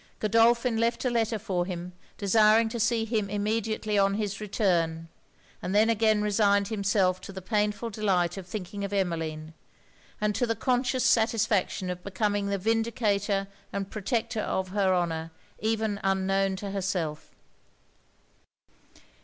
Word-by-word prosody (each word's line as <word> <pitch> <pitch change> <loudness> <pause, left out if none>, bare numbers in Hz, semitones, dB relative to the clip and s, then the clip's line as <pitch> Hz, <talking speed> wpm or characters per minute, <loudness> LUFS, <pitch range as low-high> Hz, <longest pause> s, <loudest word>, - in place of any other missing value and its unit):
Godolphin 230 +2 +3
left 230 +3 0
a 250 - +2
letter 230 -1 +1
for 190 -4 -1
him 180 -1 -5 0.2
desiring 215 +2 +4
to 235 - -4
see 225 +1 +1
him 215 -3 -1
immediately 210 0 -1
on 195 0 +3
his 205 -1 -3
return; 170 -6 0 0.5
and 185 - -3
then 220 +2 +5
again 215 -1 +2
resigned 200 -1 +2
himself 200 -3 +1
to - - -9
the 190 - -7
painful 210 +3 -1
delight 185 -5 +1
of 190 -2 -8
thinking 200 0 -5
of 200 0 -4
Emmeline, 160 -4 -2 0.7
and 210 0 +1
to 245 +3 0
the 230 - 0
conscious 250 +2 0
satisfaction 215 -5 +2
of 180 0 -7
becoming 205 +1 -1
the 200 0 0
vindicator 210 -2 0 0.2
and 200 -1 -4
protector 220 +1 -2
of 190 -2 -2
her 195 -1 +1
honour 165 -3 -1 0.3
even 220 -2 -1
unknown 195 0 +1
to 195 +1 -5
herself. 180 -6 -3
205 Hz, 140 wpm, -27 LUFS, 190-220 Hz, 0.7 s, then